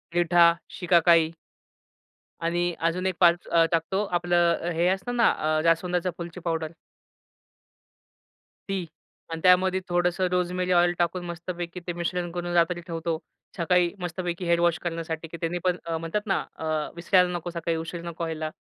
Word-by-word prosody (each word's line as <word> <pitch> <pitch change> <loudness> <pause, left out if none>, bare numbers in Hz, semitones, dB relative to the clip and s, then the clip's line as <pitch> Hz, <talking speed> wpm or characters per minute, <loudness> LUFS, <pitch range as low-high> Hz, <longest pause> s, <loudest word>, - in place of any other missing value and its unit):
रिठा, 175 0 +3 0.4
शिकाकाई 170 -2 +4 1.1
आणि 175 +1 0
अजून 170 +3 0
एक 185 -2 0
5 175 -1 +4
अ, 165 -1 +4
टाकतो, 180 +5 0
आपलं 175 -1 +1
हे 170 +2 +2
असतं 195 +6 -2
ना 235 - +5
अ 155 0 0
जास्वंदच्या 175 +2 +1
फुलची 170 +1 -7
पावडर 165 -1 -1 2.0
ती 190 -3 -1 0.5
आणि 165 0 -4
त्यामध्ये 185 +1 +5
थोडंसं 175 +1 +1
रोजमेरी 180 0 0
ऑइल 175 0 +4
टाकून 175 +1 0
मस्तपैकी 175 +1 -5
ते 175 - -1
मिश्रण 175 0 -2
करून 175 0 -4
रात्री 175 0 +2
ठेवतो. 165 -1 -3 0.4
सकाळी 175 +1 +3
मस्तपैकी 175 0 -4
हेड 170 0 +3
वॉश 170 -1 +3
करण्यासाठी 165 -1 -4
की 170 - -8
त्यानी 170 +1 -1
पण 180 -1 +2
अ, 165 -1 -2
म्हणतात 165 +6 -2
ना 195 - +2 0.2
अ, 160 - -6 0.3
विसरायला 180 +1 +3
नको 175 0 -4
सकाळी 165 -1 -2
उशीर 165 +1 -5
नको 170 0 -5
व्हायला. 160 -1 -3
175 Hz, 150 wpm, -26 LUFS, 165-180 Hz, 2.0 s, ना